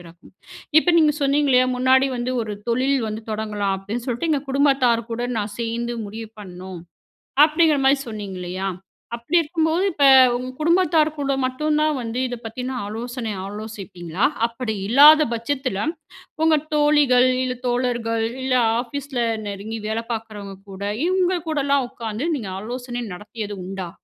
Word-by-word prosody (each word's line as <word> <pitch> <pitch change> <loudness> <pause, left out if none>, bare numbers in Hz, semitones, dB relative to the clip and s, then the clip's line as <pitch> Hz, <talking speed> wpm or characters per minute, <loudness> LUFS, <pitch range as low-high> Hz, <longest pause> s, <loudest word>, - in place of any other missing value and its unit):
பிறக்கும். 170 0 -16 0.5
இப்ப 350 - +2
நீங்க 305 -2 +4
சொன்னீங்கலயா, 275 -2 +3
முன்னாடி 260 +2 +4
வந்து 245 +1 -2
ஒரு 210 -1 -5
தொழில் 260 +3 +2
வந்து 215 +1 -5
தொடங்கலாம் 210 -2 -2
அப்டின்னு 225 +6 -5
சொல்ட்டு 250 +7 -1
எங்க 285 -2 +1
குடும்பத்தார் 265 -4 +2
கூட 240 +1 -2
நான் 205 -1 -4
சேர்ந்து 235 +1 -2
முடிவு 220 +1 -8
பண்ணோம். 185 -2 -9 0.6
அப்டிங்கிற 310 -1 +4
மாரி 270 +1 +5
சொன்னீங்க 205 -4 -6
இல்லயா? 185 +2 -4 0.5
அப்டி 235 +9 -4
இருக்கும்போது 320 +2 0
இப்ப 285 -3 +2 0.3
உங்க 250 +1 -4
குடும்பத்தார் 335 -1 +3
கூட 275 -1 0
மட்டும் 300 +4 0
தான் 310 0 +2
வந்து 230 +1 -4
இத 245 - -4
பத்தின 250 +3 -5
ஆலோசனை 230 +1 -5
ஆலோசிப்பீங்களா? 195 -3 -4 0.2
அப்டி 230 -1 -4
இல்லாத 300 +6 +8
பட்சத்துல 235 -2 -2 0.6
உங்க 320 -1 +5 0.2
தோழிகள், 295 -4 +4 0.2
இல்ல 250 -1 -3
தோழர்கள், 240 -2 0 0.2
இல்ல 260 -1 +1 0.3
ஆபீஸ்ல 265 0 -4 0.3
நெருங்கி 205 +3 -5
வேல 220 +1 -1
பார்க்றவங்க 210 -3 -6 0.2
கூட, 190 +1 -10 0.3
இவங்க 370 0 +2
கூடலாம் 280 -3 +1
உட்கார்ந்து 230 +5 -4
நீங்க 210 -6 -6
ஆலோசனை 245 +2 -5
நடத்தியது 210 +2 -7
உண்டா? 190 -2 -5
245 Hz, 140 wpm, -22 LUFS, 215-280 Hz, 0.6 s, இல்லாத